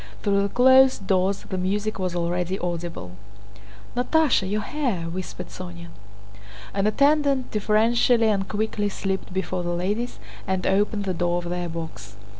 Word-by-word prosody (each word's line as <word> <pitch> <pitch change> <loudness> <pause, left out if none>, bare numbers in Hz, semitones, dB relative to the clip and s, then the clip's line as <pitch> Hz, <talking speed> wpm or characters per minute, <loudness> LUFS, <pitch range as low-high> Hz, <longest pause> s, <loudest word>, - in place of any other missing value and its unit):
Through 200 -1 +2
the 200 - 0
closed 260 -1 +5
doors 190 +1 +1
the 185 - -3
music 205 +3 -1
was 185 -2 -2
already 175 +2 -1
audible. 170 - -4 0.8
"Natásha, 250 -5 +2
your 210 +1 0
hair!..." 250 - -2
whispered 180 +1 -6
Sónya. 85 -1 -8 0.8
An 195 +1 +1
attendant 280 +2 +2
deferentially 225 +2 +3
and 195 -2 0
quickly 210 -1 -1
slipped 195 -1 -3
before 185 0 -2
the 175 0 -2
ladies 205 +7 -2 0.3
and 190 -1 -1
opened 205 +1 +1
the 190 - -1
door 175 0 0
of 175 0 -4
their 175 -1 -2
box. 165 -1 -7
195 Hz, 145 wpm, -24 LUFS, 180-220 Hz, 0.8 s, closed